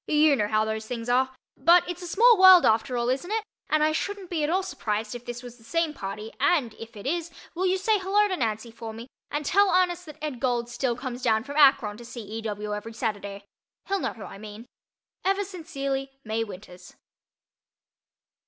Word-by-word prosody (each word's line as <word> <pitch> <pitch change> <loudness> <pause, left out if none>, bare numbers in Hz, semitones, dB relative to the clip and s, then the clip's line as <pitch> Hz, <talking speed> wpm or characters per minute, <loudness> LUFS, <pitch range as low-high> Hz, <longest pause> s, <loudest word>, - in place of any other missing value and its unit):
You 300 -1 +5
know 210 -5 0
how 215 +1 +2
those 220 0 -3
things 235 -1 -5
are. 260 +2 +3 0.3
But 345 +1 +5
it's 355 0 -5
a 355 - -6
small 465 +7 +6
world 375 -2 +9
after 230 +3 +2
all, 235 0 0
isn't 270 +8 -1
it? 440 0 0 0.3
and 305 0 +3
I 310 - +3
shouldn't 385 +3 -4
be 320 -3 0
at 295 - +1
all 375 +3 +1
surprised 215 - -3
if 245 0 -8
this 240 +1 -6
was 245 -1 -10
the - - -19
same 330 +5 0
party 210 -1 -6
and, 265 -11 +2
if 225 -1 -10
it 200 - -10
is, 335 +4 -1 0.2
will 370 +2 0
you 370 +1 +2
say 420 +2 +2
hello 400 +2 +3
to 380 - -1
Nancy 225 -4 -2
for 225 -1 -8
me, 230 +2 -8 0.2
and 295 0 -3
tell 400 +6 +4
Ernest 360 -1 +1
that 305 -1 -10
Ed. 295 -5 -4
Gold 240 -2 0
still 240 0 -1
comes 250 0 -6
down 220 -3 +2
from 285 +3 -7
Akron 255 -8 +5
to 240 - -11
see 235 -1 -8
E. 215 +2 -6
W. 210 -1 -4
every 210 +2 -6
Saturday. 205 -4 -4 0.4
He'll 395 0 0
know - - -2
who 220 - -10
I 195 - -9
mean. 215 +2 -9 0.6
Ever 390 +2 +1
sincerely, 275 -8 -4
MAY 220 +1 -1
WINTERS. 180 -3 -12
255 Hz, 215 wpm, -26 LUFS, 220-345 Hz, 0.6 s, world